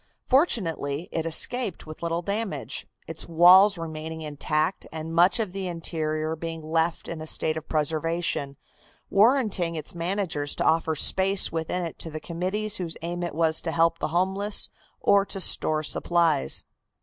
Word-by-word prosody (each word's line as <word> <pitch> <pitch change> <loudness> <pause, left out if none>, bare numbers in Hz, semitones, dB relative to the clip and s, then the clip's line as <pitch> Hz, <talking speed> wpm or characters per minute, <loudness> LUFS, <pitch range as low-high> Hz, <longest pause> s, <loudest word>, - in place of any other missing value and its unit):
Fortunately, 170 - +1
it 165 0 -2
escaped 220 +4 0
with 155 0 -10
little 170 +1 -2
damage, 205 +2 -4 0.2
its 160 -1 -7
walls 180 +4 +6
remaining 160 -1 -6
intact 155 +3 -2
and 160 0 -6
much 175 +7 +4
of 215 -5 -2
the 195 -1 -4
interior 160 -2 -3
being 165 0 -6
left 160 +1 -1
in 165 -2 -6
a 155 - -6
state 155 0 0
of 160 0 -7
preservation, 155 -2 -2 0.5
warranting 205 -6 +2
its 155 -2 -5
managers 170 -4 -2
to - - -2
offer 160 0 +2
space 190 +5 +3
within 165 +2 -2
it 165 - -6
to 165 - -6
the 155 0 -6
committees 190 +6 -2
whose 170 -3 -5
aim 175 +1 -4
it 175 -4 -4
was 160 -1 +2
to 165 - -3
help 165 0 +2
the - - -1
homeless 190 +5 0 0.3
or 200 -1 +4
to 195 0 -1
store 155 -4 +4
supplies. 165 - +1
165 Hz, 160 wpm, -25 LUFS, 160-190 Hz, 0.5 s, walls